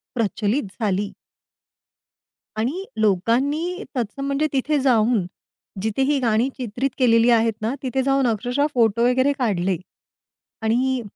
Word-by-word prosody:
प्रचलित 225 +2 0 0.2
झाली. 205 -1 0 1.5
आणि 270 - -1
लोकांनी 270 - +1
तत्सम 245 +4 -3
म्हणजे 280 +2 +1
तिथे 285 +2 +1
जाऊन 235 -6 +2 0.6
जिथे 220 +4 -1
ही 280 +1 +2
गाणी 235 +1 +1
चित्रित 250 +2 -2
केलेली 235 -2 +4
आहेत 230 -1 +3
ना, 225 +3 -1
तिथे 265 0 0
जाऊन 270 -1 +2
अक्षरशः 245 +6 0
फोटो 230 -2 +2
वगैरे 260 +3 +2
काढले. 195 -7 0 0.8
आणि 250 +3 +1
245 Hz, 120 wpm, -22 LUFS, 220-270 Hz, 1.5 s, केलेली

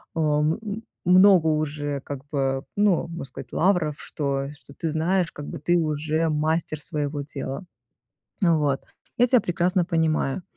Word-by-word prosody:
а, - - -1 0.2
м 155 +2 +2
м 215 +1 -5 0.2
много 185 -2 +6
уже 145 -2 -1
как 140 -1 -6
бы 135 -1 0
ну, 205 -5 +3
можно 170 -3 -6
сказать 135 - -10
лавров, 175 -5 +2
что 140 -2 -2
что 145 -1 -15
ты 165 - -3
знаешь, 170 +3 +1
как 145 - -8
бы 165 - -6
ты 175 +4 +2
уже 155 0 0
мастер 155 0 0
своего 145 -1 -3
дела. 140 +4 -5 0.8
Э, 170 - +5
вот 145 -4 +1 0.4
я 245 - +6
тебя 250 -2 +5
прекрасно 175 +1 +1
понимаю. 160 -2 0
155 Hz, 160 wpm, -25 LUFS, 145-175 Hz, 0.8 s, много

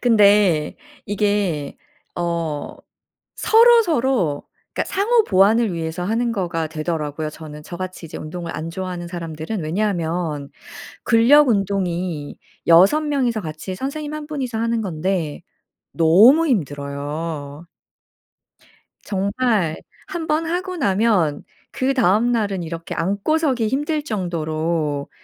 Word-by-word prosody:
근데 205 -9 +4 0.3
이게 200 -8 -1 0.4
어 170 -3 -3 0.6
서로 465 +1 +6
서로 255 - 0 0.3
그러니까 - - -2
상호 445 +4 +3
보완을 205 +3 +3
위해서 165 +1 -4
하는 230 +4 0
거가 170 -6 -2
되더라고요 155 -1 -3
저는 150 -1 -10
저같이 185 +1 -7
이제 - - -8
운동을 170 +2 -6
안 165 +2 -5
좋아하는 180 -1 -5
사람들은. 170 +3 -5
왜냐하면 165 -4 -2 0.5
근력 255 +5 +5
운동이 185 -7 -1 0.3
6 185 - +6
명이서 260 -7 0
같이 160 +2 -6
선생님 290 +5 -4
1 305 -1 -6
분이서 265 -7 -4
하는 230 0 0
건데 170 -3 -2 0.5
너무 215 - +6
힘들어요. 145 - -3 1.4
정말 200 -3 0 0.3
1 335 -3 -5
번 310 +2 +1
하고 360 +2 -3
나면 195 - +1 0.3
그 270 0 0
다음날은 215 -4 +1
이렇게 165 0 -6
앉고 200 - 0
서기 260 -8 0
힘들 295 +5 -1
정도로 160 - -2
190 Hz, 245 characters per minute, -21 LUFS, 160-240 Hz, 1.4 s, 서로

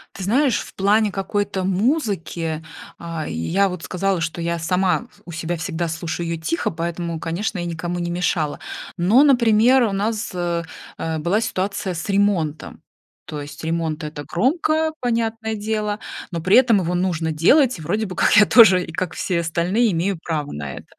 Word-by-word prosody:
Ты 195 - -6
знаешь, 250 +5 +2
в - - -11
плане 205 +2 +3
какой-то 195 0 -2
музыки, 190 - -1 0.3
а, 165 -2 -5
я 165 - +1
вот 180 -3 -6
сказала, 190 -1 -1
что 165 +1 -3
я 170 0 -1
сама 180 +6 +1
с 205 - -24
у 170 - -9
себя 165 +2 -3
всегда 165 +1 -3
слушаю 165 +1 -4
её 165 -1 -3
тихо, 165 +2 -1
поэтому, 170 0 -4
конечно, 180 +6 -3
я 175 - -3
никому 175 +1 -3
не 175 0 -2
мешала, 170 -4 -1 0.4
но, 205 +11 +5
например, 245 -2 +5
у 220 - +1
нас, 210 +3 -2
э, 175 -1 -1 0.3
э, 160 -1 -2
была 175 +8 +1
ситуация 190 -2 -2
с 165 -1 -5
ремонтом. 195 -7 0 0.4
То 150 -1 -6
есть 145 +2 -9
ремонт- 160 -1 -2
это 150 -1 -6
громко, 310 - +1
понятное 225 -2 -1
дело, 210 0 -2 0.3
но 170 - -3
при 185 +5 +3
этом 245 -4 +5
его 180 -2 -1
нужно 175 -3 0
делать, 250 - +4
и - - -10
вроде 210 +8 -1
бы 185 -3 -7
как - - +4
я 210 - +8
тоже, 190 -7 +7
как 180 0 -3
все 180 -3 -1
остальные, 180 +8 +1
имею 180 +2 0
право 150 -3 -3
на 70 -2 -5
это. - - -10
180 Hz, 175 wpm, -21 LUFS, 165-210 Hz, 0.4 s, я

